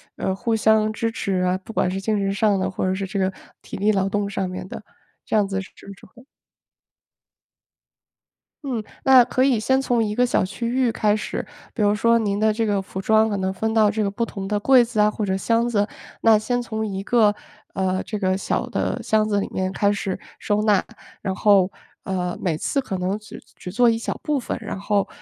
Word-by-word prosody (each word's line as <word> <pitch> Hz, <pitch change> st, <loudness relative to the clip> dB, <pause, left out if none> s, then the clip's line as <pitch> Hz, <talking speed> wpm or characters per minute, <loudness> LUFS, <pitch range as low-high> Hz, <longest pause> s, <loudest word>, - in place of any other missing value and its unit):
呃， 190 Hz, -, -1 dB
互 230 Hz, +2 st, -1 dB
相 220 Hz, 0 st, +3 dB
支 225 Hz, +1 st, -1 dB
持 195 Hz, -4 st, -1 dB
啊， 180 Hz, +1 st, +1 dB
不 225 Hz, -, -9 dB
管 180 Hz, -, +1 dB
是 190 Hz, -, -3 dB
精 215 Hz, +2 st, 0 dB
神 195 Hz, -1 st, 0 dB
上 205 Hz, -2 st, +2 dB
的， 190 Hz, 0 st, -1 dB
或 190 Hz, -, -2 dB
者 185 Hz, 0 st, 0 dB
是 195 Hz, 0 st, -3 dB
这 195 Hz, +1 st, -3 dB
个 190 Hz, 0 st, +1 dB, 0.3 s
体 -, -, -8 dB
力 205 Hz, +2 st, +2 dB
劳 195 Hz, -2 st, +1 dB
动 205 Hz, 0 st, -1 dB
上 195 Hz, -2 st, -2 dB
面 185 Hz, 0 st, -6 dB
的？ 205 Hz, -, -8 dB, 0.4 s
这 -, -, -2 dB
样 205 Hz, -2 st, +4 dB
子 195 Hz, 0 st, -2 dB
是 185 Hz, -, -11 dB, 0.2 s
不 200 Hz, -, -9 dB
是 -, -, -16 dB
会 245 Hz, -, -18 dB, 2.4 s
嗯， 245 Hz, -6 st, -3 dB, 0.2 s
那 260 Hz, -2 st, +7 dB
可 255 Hz, +1 st, 0 dB
以 260 Hz, -5 st, +3 dB
先 265 Hz, +4 st, +2 dB
从 240 Hz, -3 st, +1 dB
一 210 Hz, -1 st, -2 dB
个 250 Hz, -, +3 dB
小 245 Hz, -, +1 dB
区 205 Hz, +5 st, -4 dB
域 250 Hz, 0 st, +1 dB
开 210 Hz, -2 st, +1 dB
始。 215 Hz, -, -4 dB, 0.3 s
比 225 Hz, -, -2 dB
如 205 Hz, 0 st, +4 dB
说 230 Hz, +2 st, +3 dB
您 205 Hz, -3 st, -1 dB
的 215 Hz, 0 st, +3 dB
这 225 Hz, +1 st, -1 dB
个 205 Hz, -2 st, +1 dB
服 190 Hz, 0 st, -7 dB
装 220 Hz, +2 st, +3 dB
可 205 Hz, -, -1 dB
能 190 Hz, 0 st, -1 dB
分 220 Hz, +4 st, -2 dB
到 215 Hz, -2 st, +4 dB
这 215 Hz, 0 st, -1 dB
个 200 Hz, -, 0 dB
不 230 Hz, +4 st, -2 dB
同 195 Hz, -3 st, -6 dB
的 205 Hz, 0 st, 0 dB
柜 255 Hz, +2 st, +6 dB
子 230 Hz, -2 st, -3 dB
啊， 210 Hz, 0 st, +4 dB
或 215 Hz, -, -4 dB
者 190 Hz, -1 st, 0 dB
箱 230 Hz, +4 st, +1 dB
子， 205 Hz, -2 st, +1 dB, 0.3 s
那 225 Hz, -2 st, +5 dB
先 245 Hz, +3 st, -1 dB
从 220 Hz, -2 st, -3 dB
一 195 Hz, -2 st, -4 dB
个， 215 Hz, -2 st, +3 dB, 0.4 s
呃， 185 Hz, 0 st, 0 dB
这 215 Hz, -, -4 dB
个 185 Hz, -2 st, +1 dB
小 195 Hz, -, -1 dB
的 -, -, -2 dB
箱 215 Hz, 0 st, +2 dB
子 205 Hz, -1 st, +2 dB
里 -, -, -2 dB
面 185 Hz, 0 st, -1 dB
开 200 Hz, +1 st, +2 dB
始 200 Hz, -2 st, -3 dB, 0.2 s
收 210 Hz, 0 st, 0 dB
纳。 210 Hz, -3 st, +3 dB, 0.4 s
然 190 Hz, -1 st, -2 dB
后， 195 Hz, -3 st, +4 dB, 0.3 s
呃， 180 Hz, -2 st, -2 dB
每 165 Hz, -4 st, 0 dB
次 275 Hz, -, -1 dB
可 195 Hz, -7 st, -4 dB
能 190 Hz, +3 st, -2 dB
只 215 Hz, -, -11 dB, 0.2 s
只 180 Hz, -, -8 dB
做 245 Hz, +4 st, +4 dB
一 225 Hz, -, 0 dB
小 -, -, -4 dB
部 295 Hz, -2 st, 0 dB
分， 245 Hz, -, -4 dB
然 -, -, -6 dB
后， 200 Hz, 0 st, 0 dB
210 Hz, 245 characters per minute, -22 LUFS, 195-225 Hz, 2.4 s, 那